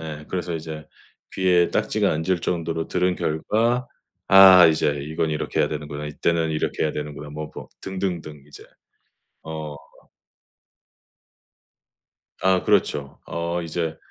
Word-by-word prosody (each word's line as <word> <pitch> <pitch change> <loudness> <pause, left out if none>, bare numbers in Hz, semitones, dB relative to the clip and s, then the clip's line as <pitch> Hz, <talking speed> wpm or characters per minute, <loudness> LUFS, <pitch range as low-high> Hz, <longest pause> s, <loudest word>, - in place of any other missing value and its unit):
예. 75 -2 -7
그래서 90 -2 -3
이제 80 -1 -7 0.5
귀에 90 -2 +3
딱지가 - - +1
앉을 85 +3 0
정도로 80 -1 -2
들은 90 0 +1
결과 115 +11 0 0.4
'아 95 -2 +9
이제 75 -2 +1
이거는 80 +1 -2
이렇게 75 - -2
해야 - - +2
되는구나. 75 0 -5
이때는 80 +2 0
이렇게 75 -1 -2
해야 75 - 0
되는구나.' 75 0 -6
뭐 75 0 -6
뭐 - - -9
등등등 90 -6 -4
이제 75 - -14 0.8
어. 80 -2 -6 2.7
아, 95 -1 +3
그렇죠. 70 -2 0
어 85 +1 -3
이제 80 -1 -3
80 Hz, 265 characters per minute, -23 LUFS, 75-90 Hz, 2.7 s, 아